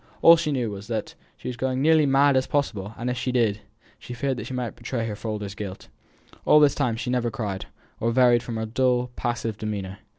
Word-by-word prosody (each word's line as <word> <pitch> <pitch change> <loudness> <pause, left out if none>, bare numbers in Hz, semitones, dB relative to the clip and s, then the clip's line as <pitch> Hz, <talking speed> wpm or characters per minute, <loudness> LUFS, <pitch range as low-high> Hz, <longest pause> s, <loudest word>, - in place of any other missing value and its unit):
All 165 - +10
she 165 -2 -1
knew 125 -6 -1
was, 100 0 -8
that 110 -2 -3 0.2
she - - -9
was 125 - -4
as 130 +1 -1
nearly 155 +2 +4
going 135 - +1
mad 140 0 +5
as 130 0 +2
possible; 110 -8 -2
and 120 - -4
if 125 0 -1
she 125 - -1
did, 115 -4 +1 0.4
she 125 - -8
feared 135 +1 -1
that - - -5
she - - -6
might 125 -2 -3
betray 115 -3 -3
her 110 -2 -4
father's 105 -2 -5
guilt. 100 -2 -7 0.5
All 150 - +6
this 145 -2 +5
time 120 -2 0
she 120 +2 -3
never 125 -1 +1
cried, 105 -4 -4 0.3
or 115 - +1
varied 120 0 +4
from 120 -1 -6
her 110 - -2
dull, 125 +1 +1
passive 115 -3 -3
demeanour. 100 -3 -4
120 Hz, 230 wpm, -25 LUFS, 110-130 Hz, 0.5 s, All